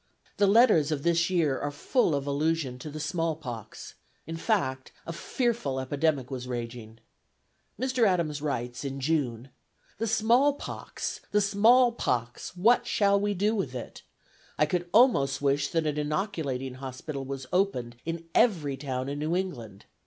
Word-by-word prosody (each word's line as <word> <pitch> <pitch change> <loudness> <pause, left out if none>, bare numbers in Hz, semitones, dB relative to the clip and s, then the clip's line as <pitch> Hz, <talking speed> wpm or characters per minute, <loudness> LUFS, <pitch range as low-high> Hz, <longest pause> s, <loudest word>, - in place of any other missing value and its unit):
The 200 - +4
letters 200 - +5
of 145 -2 -2
this 170 0 +2
year 160 -7 +1
are 145 - -2
full 155 - +1
of 140 -1 -2
allusion 145 -2 -1
to 150 - -7
the 155 +1 -7
small 165 +1 -1
pox; 120 -8 -8 0.3
in 165 - -5
fact, 165 - -1
a 165 - -5
fearful 220 - -1
epidemic 140 0 0
was 125 -1 -5
raging. 115 -2 -6 0.8
Mr. 255 -3 +2
Adams 165 -6 0
writes 120 -4 -3
in 135 -1 -4
June: 135 -4 -1 0.5
"The 225 - -1
small 230 +6 +4
pox! - - -6
the 210 - +3
small 220 +5 +5
pox! 125 - -3
what 240 +6 +4
shall 200 -1 +3
we 205 0 0
do 205 +4 +1
with 155 - -2
it? 125 - -7 0.6
I 150 - +4
could 175 +2 -2
almost 140 - +4
wish 140 0 +1
that 165 -1 0
an 150 -1 -1
inoculating 150 -5 -2
hospital 135 +2 -6
was 135 0 -6
opened 155 -11 0
in 165 0 -4
every 155 - +2
town 130 -2 -3
in 140 +1 -4
New 155 +3 -1
England. 120 - -4
155 Hz, 160 wpm, -28 LUFS, 135-195 Hz, 0.8 s, letters